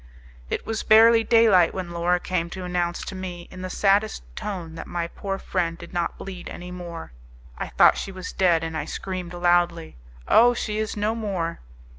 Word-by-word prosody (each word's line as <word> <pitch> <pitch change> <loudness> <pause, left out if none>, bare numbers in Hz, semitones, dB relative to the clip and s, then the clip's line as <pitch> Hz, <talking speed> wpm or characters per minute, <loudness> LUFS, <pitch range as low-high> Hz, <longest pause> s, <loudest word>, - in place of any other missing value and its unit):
It - - -3
was 225 -1 -2
barely 225 +1 +6
daylight 220 -7 +5
when 185 -2 -4
Laura 175 +1 +1
same 170 -2 -1
to 185 +1 -7
announce 175 -1 -2
to - - -6
me, 180 -2 -7
in 185 - -9
the 185 - -4
saddest 200 - +1
tone, 175 -6 -5
that 165 - -8
my 170 -1 -2
poor 195 +3 -4
friend 170 -4 -2
did - - -12
not 175 -1 -2
bleed 190 -2 -8
any 180 +1 -8
more. 175 -2 -8 0.4
I - - -4
thought - - +5
she 195 - -5
was 185 -1 -7
dead, 175 -3 +3
and 160 0 -4
I 155 - -2
screamed 180 -2 -5
loudly, 175 - +1 0.3
"Oh! 245 +2 +6
she 215 -2 -2
is 215 -1 -3
no 210 +2 0
more!" 195 -7 -3
180 Hz, 190 wpm, -24 LUFS, 170-200 Hz, 0.4 s, barely